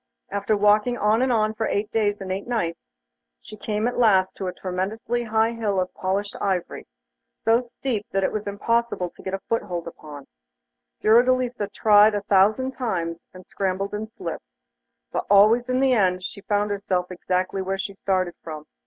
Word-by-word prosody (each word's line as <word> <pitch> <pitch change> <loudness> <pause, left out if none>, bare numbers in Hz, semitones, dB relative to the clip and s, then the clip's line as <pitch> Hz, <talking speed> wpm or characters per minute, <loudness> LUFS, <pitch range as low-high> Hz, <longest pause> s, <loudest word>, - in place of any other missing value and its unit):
After 200 +1 0
walking 210 +4 +3
on 215 +3 +2
and 260 0 +2
on 215 -2 +2
for 220 0 -2
eight 205 +1 -1
days 205 -2 0
and 190 -1 -5
eight 195 +3 -4
nights, 170 -9 -1 0.6
she 215 - -11
came 215 +1 -2
at 245 - -2
last 190 -5 +4
to 190 - -4
a - - -1
tremendously 205 +7 -3
high 220 +1 +2
hill 215 -4 -1
of 185 0 -2
polished 200 +2 -2
ivory, 190 -3 -2 0.5
so 230 +2 +2
steep 240 -3 -4
that 195 0 0
it - - +1
was 210 -1 -4
impossible 205 -2 -1
to - - -16
get 190 0 -3
a - - -6
foothold 180 -7 -2
upon 150 -3 -10
it. - - -30 0.7
Fiordelisa 245 0 +3
tried 210 0 +5
a 205 - -1
thousand 210 +7 +3
times, 175 -10 -3
and 185 0 -13
scrambled 195 +1 -2
and 215 +1 -4
slipped, - - -7 0.6
but - - -3
always 220 +5 +5
in 255 0 +1
the 265 -1 +3
end 185 -5 +2 0.2
found 205 0 +1
herself 185 -3 -1
exactly 185 +1 -1
where 190 +1 -2
she 200 +1 -4
started 185 -2 -1
from. 155 -2 -8
205 Hz, 180 wpm, -24 LUFS, 185-225 Hz, 0.7 s, tried